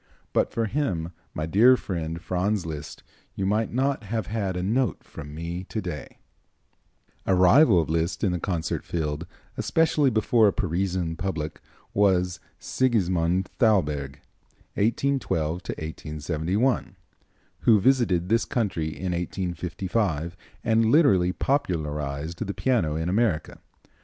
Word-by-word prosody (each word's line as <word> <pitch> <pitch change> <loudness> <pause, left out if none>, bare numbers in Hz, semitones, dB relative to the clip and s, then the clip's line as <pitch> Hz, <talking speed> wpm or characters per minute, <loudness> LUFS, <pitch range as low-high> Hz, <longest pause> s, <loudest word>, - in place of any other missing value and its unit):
But - - +2
for 115 - 0
him, 95 - -1 0.2
my 80 - -2
dear 115 +10 +6
friend, 85 -5 -4
Franz 95 +2 -1
Liszt, 75 -3 -7 0.3
you 95 - -2
might 105 +3 +1
not 130 -1 0
have 110 0 -2
had 100 -3 -2
a 90 - -2
note 120 +6 0
from 75 +1 -9
me 85 +3 -4
to 110 - -4
day." 85 -8 -6 1.1
A 95 - +4
rival 95 - +6
of 80 - 0
Liszt 85 +2 -1
in 100 - +3
the 90 - -1
concert 85 -3 -2
field, 80 0 -3 0.3
especially 160 -3 +2
before 110 0 +3
a 100 - +2
Parisian 90 -3 -1
public, 80 -5 -3 0.3
was 90 -2 +2 0.2
Sigismund 95 -7 +1
Thalberg 75 - +1 0.5
(1812 105 - 0
1871), 80 - -2 0.6
who 110 -3 +5
visited 100 -7 +2
this 115 +3 +2
country 100 -9 -1
in 90 +3 -4
1855 90 0 -2 0.3
and 110 0 +3
literally 100 - +5
popularized 80 - -2
the 100 -2 -5
piano 110 -13 +1
in 80 +1 -2
America. 95 -4 0
90 Hz, 125 wpm, -25 LUFS, 80-110 Hz, 1.1 s, dear